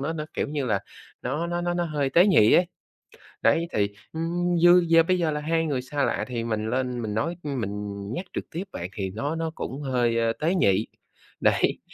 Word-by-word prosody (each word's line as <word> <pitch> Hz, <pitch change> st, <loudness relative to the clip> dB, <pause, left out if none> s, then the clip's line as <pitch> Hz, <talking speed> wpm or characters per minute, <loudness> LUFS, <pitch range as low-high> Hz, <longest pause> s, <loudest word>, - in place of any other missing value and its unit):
nó 145 Hz, +4 st, -2 dB
nó, 155 Hz, -2 st, -4 dB
kiểu, -, -, -1 dB
như 145 Hz, -2 st, -2 dB
là 105 Hz, -4 st, +1 dB, 0.4 s
nó 155 Hz, +6 st, -2 dB
nó 175 Hz, 0 st, -2 dB
nó 175 Hz, 0 st, -1 dB
nó 175 Hz, 0 st, 0 dB
hơi 145 Hz, -4 st, -1 dB
tế 175 Hz, +4 st, +6 dB
nhị 110 Hz, -, +5 dB
ấy. 180 Hz, -, +5 dB, 0.8 s
Đấy 170 Hz, +1 st, +3 dB
thì, 100 Hz, -1 st, +1 dB, 0.2 s
ừm, 175 Hz, +2 st, -1 dB
như 175 Hz, +1 st, +6 dB
giờ 165 Hz, 0 st, +6 dB
bây 185 Hz, +2 st, +1 dB
giờ 165 Hz, -3 st, +1 dB
là 150 Hz, -, -2 dB
hai 165 Hz, +1 st, 0 dB
người 135 Hz, -4 st, -1 dB
xa 140 Hz, +2 st, -2 dB
lạ 120 Hz, -, 0 dB
thì 120 Hz, -2 st, -3 dB
mình 110 Hz, -1 st, -2 dB
lên 125 Hz, 0 st, -1 dB
mình 105 Hz, -2 st, -3 dB
nói 165 Hz, +11 st, -1 dB
mình 105 Hz, -7 st, -3 dB, 0.2 s
nhắc 180 Hz, -, -4 dB
trực -, -, -5 dB
tiếp 170 Hz, +4 st, -3 dB
vậy 90 Hz, -, -5 dB
thì 95 Hz, -3 st, -3 dB
nó 140 Hz, +11 st, -3 dB
nó 165 Hz, -1 st, -2 dB
cũng 135 Hz, +3 st, -5 dB
hơi, 120 Hz, -4 st, +1 dB
ơ, 115 Hz, 0 st, +2 dB
tế 165 Hz, +5 st, +1 dB
nhị, 100 Hz, -, +2 dB, 0.5 s
đấy, -, -, +2 dB
145 Hz, 220 wpm, -25 LUFS, 115-165 Hz, 0.8 s, tế